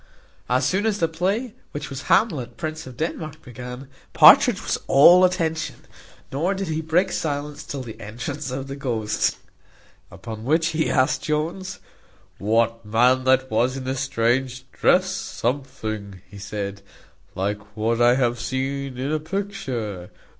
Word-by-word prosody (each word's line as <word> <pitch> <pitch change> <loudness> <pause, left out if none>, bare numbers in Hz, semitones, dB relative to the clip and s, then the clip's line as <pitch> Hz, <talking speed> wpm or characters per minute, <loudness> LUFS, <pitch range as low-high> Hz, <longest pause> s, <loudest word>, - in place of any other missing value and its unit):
As 125 +2 +2
soon 200 +8 +1
as 210 -2 +1
the 165 - +2
play, 195 +9 -1 0.2
which 145 - -5
was 135 0 -5
Hamlet, 130 - +2
Prince 155 -2 -5
of 125 -2 -11
Denmark, 155 0 -4
began, 125 +2 -8 0.3
Partridge - - +7
was - - -1
all 175 +7 +8
attention, 165 -3 0 0.6
nor 170 +9 0
did 195 -2 -3
he 160 0 -1
break 175 +4 +1
silence 145 -3 -3
till 140 -2 -5
the 115 -3 -10
entrance 120 +7 -5
of 130 +1 -4
the 135 - -5
ghost; 110 -6 -1 0.7
upon 110 +3 -8
which 160 +6 +2
he 160 -1 0
asked 130 0 +2
Jones, 170 +5 -2 0.6
"What 115 +2 +1
man 125 +5 +3
that 130 0 +3
was 125 +4 +1
in 135 - -5
the 130 +1 -2
strange 130 0 0
dress; - - +3
something," 110 -6 -4 0.2
said 100 0 -5
he, 100 -1 -19
"like 105 +2 -3
what 115 +2 0
I 120 +1 +6
have 120 -2 +1
seen 135 0 -3
in 135 +3 -2
a 155 - +1
picture. 135 - -4
130 Hz, 150 wpm, -23 LUFS, 115-155 Hz, 0.7 s, all